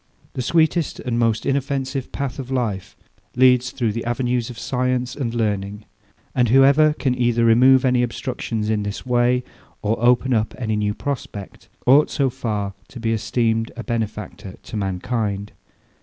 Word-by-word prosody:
The -, -, -3 dB
sweetest 160 Hz, +4 st, +1 dB
and 120 Hz, -2 st, -2 dB
most 115 Hz, -2 st, +1 dB
inoffensive 135 Hz, -1 st, -2 dB
path 140 Hz, -1 st, -4 dB
of 130 Hz, -2 st, -6 dB
life 115 Hz, -8 st, -2 dB, 0.4 s
leads 125 Hz, 0 st, +4 dB
through 120 Hz, -5 st, -1 dB
the 115 Hz, +2 st, -4 dB
avenues 120 Hz, 0 st, -1 dB
of 120 Hz, -, -9 dB
science 125 Hz, 0 st, -1 dB
and 125 Hz, -5 st, -2 dB
learning; 105 Hz, -2 st, -2 dB, 0.5 s
and 125 Hz, -3 st, +2 dB
whoever 140 Hz, +4 st, +5 dB
can 135 Hz, -4 st, 0 dB
either 120 Hz, -2 st, +1 dB
remove 125 Hz, +3 st, +6 dB
any 125 Hz, -1 st, +3 dB
obstructions 115 Hz, -2 st, -3 dB
in 105 Hz, -1 st, 0 dB
this 105 Hz, +3 st, -5 dB
way, 125 Hz, 0 st, +2 dB, 0.4 s
or 110 Hz, +2 st, -1 dB
open 125 Hz, +1 st, +3 dB
up 110 Hz, -2 st, 0 dB
any 110 Hz, -4 st, -1 dB
new 105 Hz, 0 st, -1 dB
prospect, 120 Hz, -8 st, -6 dB, 0.2 s
ought 140 Hz, +4 st, +6 dB
so 135 Hz, -2 st, 0 dB
far 105 Hz, -6 st, -3 dB
to 125 Hz, -, -10 dB
be 115 Hz, 0 st, 0 dB
esteemed 115 Hz, +1 st, 0 dB
a 120 Hz, -, -5 dB
benefactor 105 Hz, -4 st, -4 dB
to -, -, -8 dB
mankind. 100 Hz, +1 st, -2 dB
120 Hz, 155 wpm, -21 LUFS, 110-130 Hz, 0.5 s, remove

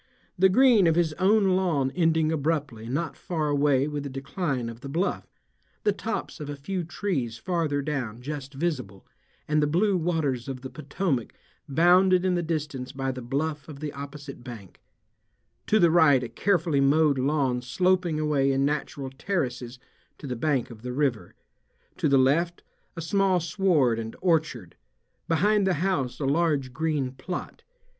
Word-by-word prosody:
The 190 Hz, +2 st, +5 dB
green 230 Hz, -3 st, +5 dB
of 165 Hz, -, +3 dB
his 165 Hz, -2 st, +1 dB
own 195 Hz, 0 st, +4 dB
lawn 160 Hz, -8 st, +1 dB
ending 160 Hz, -1 st, +2 dB
abruptly 145 Hz, -7 st, -2 dB
not 150 Hz, +5 st, -2 dB
far 155 Hz, -4 st, -2 dB
away 145 Hz, -1 st, +2 dB
with 150 Hz, -1 st, -3 dB
the 140 Hz, -, -5 dB
decline 135 Hz, -1 st, -3 dB
of 115 Hz, +1 st, -8 dB
the 140 Hz, -, -7 dB
bluff, 170 Hz, +7 st, -1 dB, 0.6 s
the 210 Hz, -, +3 dB
tops 210 Hz, -2 st, -4 dB
of 150 Hz, -1 st, -6 dB
a 145 Hz, -, -4 dB
few 180 Hz, +6 st, -4 dB
trees 155 Hz, -, -3 dB
farther 160 Hz, -4 st, -1 dB
down 130 Hz, -6 st, -3 dB
just 140 Hz, +1 st, -6 dB
visible, 130 Hz, -, -3 dB, 0.4 s
and 150 Hz, 0 st, +2 dB
the 150 Hz, -, +2 dB
blue 190 Hz, +6 st, +2 dB
waters 160 Hz, -8 st, -1 dB
of 130 Hz, -2 st, -5 dB
the 130 Hz, -, -8 dB
Potomac 155 Hz, -, -2 dB, 0.4 s
bounded 180 Hz, +5 st, +4 dB
in 185 Hz, -, +2 dB
the 175 Hz, -, +1 dB
distance 150 Hz, -6 st, -3 dB
by 135 Hz, -1 st, -2 dB
the 130 Hz, 0 st, -7 dB
bluff 145 Hz, +4 st, -3 dB
of 145 Hz, -2 st, -9 dB
the 150 Hz, -1 st, -5 dB
opposite 140 Hz, -2 st, -8 dB
bank; 115 Hz, -7 st, -11 dB, 0.9 s
to 215 Hz, -, +4 dB
the 170 Hz, -5 st, +5 dB
right 150 Hz, -6 st, +5 dB
a 120 Hz, -, -5 dB
carefully 170 Hz, -7 st, +1 dB
mowed 145 Hz, 0 st, +3 dB
lawn 135 Hz, -2 st, +1 dB
sloping 180 Hz, +5 st, +1 dB
away 145 Hz, -3 st, +2 dB
in 135 Hz, 0 st, +1 dB
natural 145 Hz, -2 st, -3 dB
terraces 130 Hz, -6 st, -3 dB, 0.4 s
to -, -, -10 dB
the 125 Hz, -2 st, -3 dB
bank 130 Hz, -1 st, 0 dB
of 110 Hz, -2 st, -12 dB
the 125 Hz, +1 st, -5 dB
river; 130 Hz, -5 st, -1 dB, 0.6 s
to -, -, +1 dB
the 140 Hz, -, +5 dB
left 165 Hz, +7 st, +2 dB, 0.3 s
a 165 Hz, -, -5 dB
small 190 Hz, +2 st, +2 dB
sward 160 Hz, -, +2 dB
and 110 Hz, 0 st, -6 dB
orchard; 155 Hz, -, 0 dB, 0.5 s
behind 200 Hz, +5 st, +2 dB
the 190 Hz, -, +2 dB
house 145 Hz, -7 st, -1 dB
a 145 Hz, -, -2 dB
large 140 Hz, -3 st, +1 dB
green 150 Hz, -4 st, -1 dB
plot. 175 Hz, +7 st, -7 dB
150 Hz, 165 wpm, -26 LUFS, 135-175 Hz, 0.9 s, The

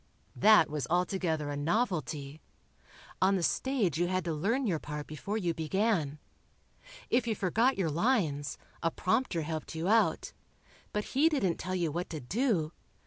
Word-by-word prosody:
That 215 Hz, -6 st, +6 dB
was 150 Hz, -4 st, -3 dB
altogether 175 Hz, -4 st, 0 dB
a -, -, -3 dB
novelty. 150 Hz, -, -1 dB, 0.8 s
On 190 Hz, +1 st, +4 dB
the 180 Hz, -, -1 dB
stage 210 Hz, -, 0 dB
you 175 Hz, -, +2 dB
had 185 Hz, 0 st, -1 dB
to 165 Hz, -, -1 dB
learn 225 Hz, -, 0 dB
your 175 Hz, -8 st, 0 dB
part 150 Hz, 0 st, -6 dB
before 195 Hz, +8 st, -4 dB
you 175 Hz, -6 st, 0 dB
began. 165 Hz, -2 st, 0 dB, 0.9 s
If 240 Hz, 0 st, +2 dB
you 220 Hz, -, +1 dB
forgot 225 Hz, +8 st, +2 dB
your 175 Hz, -5 st, 0 dB
lines, 160 Hz, -, 0 dB, 0.2 s
a 165 Hz, -, +2 dB
prompter 180 Hz, -1 st, 0 dB
helped 160 Hz, +1 st, -5 dB
you 160 Hz, +2 st, -2 dB
out, 225 Hz, +2 st, +2 dB, 0.6 s
but 210 Hz, -, -1 dB
he 295 Hz, +5 st, +5 dB
didn't 195 Hz, -, 0 dB
tell 185 Hz, 0 st, -3 dB
you 170 Hz, -4 st, 0 dB
what 175 Hz, +4 st, -3 dB
to 155 Hz, -, -5 dB
do... 175 Hz, -, 0 dB
175 Hz, 160 wpm, -31 LUFS, 155-215 Hz, 0.9 s, That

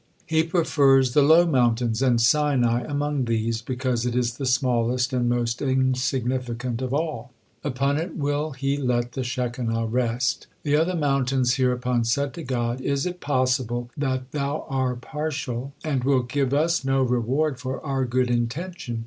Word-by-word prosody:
He 160 Hz, 0 st, +2 dB
prefers 140 Hz, -6 st, +3 dB
the 145 Hz, -, +5 dB
low 160 Hz, +5 st, +6 dB
mountains, 120 Hz, -5 st, +1 dB
and 125 Hz, -3 st, +3 dB
Sinai 125 Hz, -2 st, +3 dB
among 145 Hz, -2 st, -1 dB
these, 115 Hz, 0 st, -1 dB
because 125 Hz, -1 st, -2 dB
it 120 Hz, -1 st, -1 dB
is 120 Hz, -1 st, 0 dB
the 135 Hz, -, -3 dB
smallest 125 Hz, 0 st, +1 dB
and 120 Hz, -1 st, +1 dB
most 120 Hz, -1 st, -1 dB
insignificant 130 Hz, -2 st, -1 dB
of 130 Hz, -1 st, -3 dB
all. 145 Hz, -5 st, -2 dB, 0.3 s
Upon 140 Hz, 0 st, 0 dB
it 165 Hz, +1 st, -4 dB
will 145 Hz, +1 st, -1 dB
He 135 Hz, +1 st, -1 dB
let 125 Hz, -3 st, 0 dB
the 130 Hz, -, -3 dB
Shekinah 120 Hz, -2 st, -2 dB
rest." 120 Hz, +1 st, -1 dB, 0.2 s
The 145 Hz, -1 st, +2 dB
other 165 Hz, +4 st, +2 dB
mountains 135 Hz, -4 st, +1 dB
hereupon 125 Hz, -2 st, +1 dB
said 135 Hz, +5 st, 0 dB
to 170 Hz, -, -7 dB
God, 125 Hz, -1 st, -2 dB
"Is 140 Hz, +1 st, -1 dB
it 180 Hz, 0 st, -4 dB
possible 125 Hz, -4 st, 0 dB
that 130 Hz, -2 st, -2 dB
Thou 145 Hz, +1 st, -2 dB
are 130 Hz, -2 st, 0 dB
partial, 140 Hz, -2 st, -4 dB
and 140 Hz, -5 st, -1 dB
wilt 130 Hz, -2 st, +1 dB
give 135 Hz, -1 st, 0 dB
us 160 Hz, +3 st, +1 dB
no 135 Hz, 0 st, +2 dB
reward 130 Hz, +4 st, 0 dB
for 130 Hz, +1 st, -4 dB
our 135 Hz, -2 st, 0 dB
good 125 Hz, 0 st, 0 dB
intention?" 120 Hz, +2 st, -3 dB
130 Hz, 160 wpm, -24 LUFS, 120-140 Hz, 0.3 s, low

